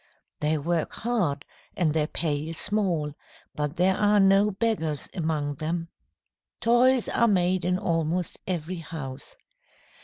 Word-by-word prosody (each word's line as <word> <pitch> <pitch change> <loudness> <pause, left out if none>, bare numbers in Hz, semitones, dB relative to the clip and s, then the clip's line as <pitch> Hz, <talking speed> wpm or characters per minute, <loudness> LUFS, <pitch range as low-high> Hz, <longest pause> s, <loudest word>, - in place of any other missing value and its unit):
They 150 +1 +1
work 165 +2 -1
hard, 185 -12 -1 0.3
and 160 -5 +2
their 155 -1 +1
pay 150 -2 -1
is 165 - -4
small, 180 -8 0 0.4
but 150 +1 -2
there 185 +2 +3
are 210 +1 +3
no 195 +1 +5
beggars 190 - -1
among 150 -4 -2
them. 165 +2 -3 0.7
Toys 245 +1 +4
are 235 - +3
made 185 -3 +2
in 180 0 +1
almost 165 0 -1
every 180 0 -2
house. 160 - -7
170 Hz, 130 wpm, -26 LUFS, 155-195 Hz, 0.7 s, no